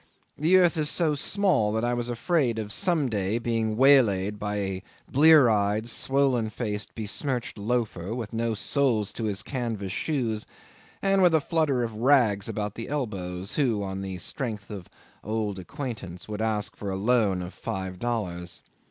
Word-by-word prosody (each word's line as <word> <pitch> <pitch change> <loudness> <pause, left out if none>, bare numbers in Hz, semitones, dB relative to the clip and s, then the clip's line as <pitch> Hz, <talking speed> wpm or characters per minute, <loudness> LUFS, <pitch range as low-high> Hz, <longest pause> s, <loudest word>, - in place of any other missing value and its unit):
The 165 +6 +4
earth 175 -2 +4
is 150 -1 +1
so 160 -1 +2
small 150 - +1
that 110 +1 0
I 120 - +1
was 120 0 -2
afraid 125 -1 +1
of, 105 -1 -3
some 165 -6 +1
day, 105 -1 -1
being 115 -2 -1
waylaid 105 -7 +4
by 105 0 -2
a 95 -2 -3 0.2
blear 150 -1 +7
eyed, 105 0 +1
swollen 130 -2 +1
faced, 105 -2 -4
besmirched 120 +3 -2
loafer, 110 -3 -2
with 115 -4 -5
no 115 0 0
soles 115 -3 +1
to 115 - -4
his 100 -2 -2
canvas 115 -7 -3
shoes, 115 -5 -2 0.6
and 195 0 +3
with 175 -3 +5
a - - +5
flutter 145 -4 +1
of 115 -1 -3
rags 115 -4 +3
about 105 -2 -3
the 115 - -7
elbows, 95 -9 -4
who, 120 -8 +1
on 95 0 -4
the 95 -1 -5
strength 105 +2 -4
of 95 -4 -8 0.3
old 105 -2 -2
acquaintance, 95 -4 -6
would 105 0 -4
ask 105 -3 -1
for 100 - -5
a 95 - -2
loan 100 -3 +2
of 90 - -8
five 95 -1 -5
dollars. 90 -7 -3
110 Hz, 170 wpm, -26 LUFS, 100-135 Hz, 0.6 s, blear